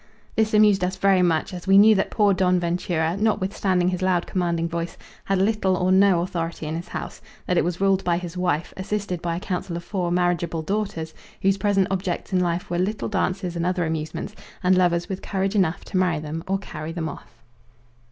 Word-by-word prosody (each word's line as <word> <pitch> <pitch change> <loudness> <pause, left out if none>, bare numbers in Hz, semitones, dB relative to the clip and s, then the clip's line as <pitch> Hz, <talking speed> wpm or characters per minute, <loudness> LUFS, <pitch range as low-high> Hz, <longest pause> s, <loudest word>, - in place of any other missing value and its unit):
This 220 -1 +2
amused 210 -3 +5
us 185 +1 0
very 190 -1 +3
much, 170 0 +1
as 180 +1 -8
we 195 0 +6
knew 215 +2 +8
that 195 - 0
poor 205 -2 +3
Don 180 -1 +2
Ventura, 170 -1 -1
notwithstanding 195 -3 +1
his 180 0 -3
loud 185 -2 +1
commanding 170 -2 -1
voice, 170 0 -4 0.3
had 195 - +1
little 195 -1 +2
or 180 +1 +1
no 190 -2 +5
authority 170 -3 -3
in 155 +1 -3
his 170 +2 -5
house; - - -6 0.2
that 180 - 0
it - - +3
was 175 0 -2
ruled 195 -1 +2
by 175 -1 +1
his 175 -1 -6
wife, 175 -3 -1
assisted 190 -2 -3
by 170 -1 -2
a - - -3
council 180 -2 -3
of 170 - -7
four 180 -2 -2
marriageable 175 -2 0
daughters, 190 -4 -3 0.3
whose 195 +1 +2
present 195 -1 +2
objects 185 0 -3
in 185 - +3
life 175 0 -1
were 175 0 -2
little 210 +4 -1
dances 185 -3 -1
and 170 - -1
other 180 -1 0
amusements, 160 +5 -4 0.3
and 185 +1 +4
lovers 175 -2 +2
with 190 -1 -5
courage 195 0 -1
enough 185 -5 +1
to - - -3
marry 180 -3 +2
them 155 +2 -5
or 195 +1 +1
carry 155 -5 -7
them 165 -1 -3
off. 115 -5 -11
180 Hz, 210 wpm, -24 LUFS, 170-195 Hz, 0.3 s, knew